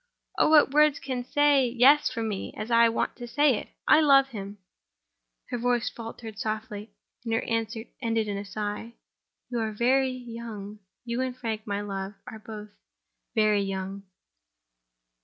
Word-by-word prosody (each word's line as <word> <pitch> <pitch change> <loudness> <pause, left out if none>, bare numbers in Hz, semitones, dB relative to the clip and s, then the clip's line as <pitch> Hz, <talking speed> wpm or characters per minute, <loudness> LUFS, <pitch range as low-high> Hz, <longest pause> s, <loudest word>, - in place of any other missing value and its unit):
"Oh, - - +5
what 305 -3 +6
words 300 0 +4
can 255 -2 -4
say 285 0 +3
Yes 260 +5 +5
for 230 - -4
me, 210 -3 -4
as 215 +3 -5
I 230 0 +6
want 225 - -1
to 240 -1 -7
say 285 -1 +3
it? - - -7 0.2
I 310 - +7
love 275 -2 +5
him—!" 200 -3 -7 0.9
Her 245 - -3
voice 245 0 +1
faltered 225 -2 -8
softly; 215 0 -4 0.3
and 230 - -4
her - - 0
answer 225 -1 -2 0.2
ended 225 -2 0
in 205 - -2
a 200 - -4
sigh. 210 +3 -5 0.6
"You 240 - -1
are 220 -1 -1
very 260 +4 +2
young. 230 -4 -7 0.3
You 235 +1 -2
and 255 -1 -3
Frank, 220 -3 -4
my 200 0 -1
love, 195 -1 -5
are 220 - -9
both 215 -1 -9 0.7
very 215 -2 +3
young." 195 0 -4
230 Hz, 160 wpm, -27 LUFS, 210-255 Hz, 0.9 s, I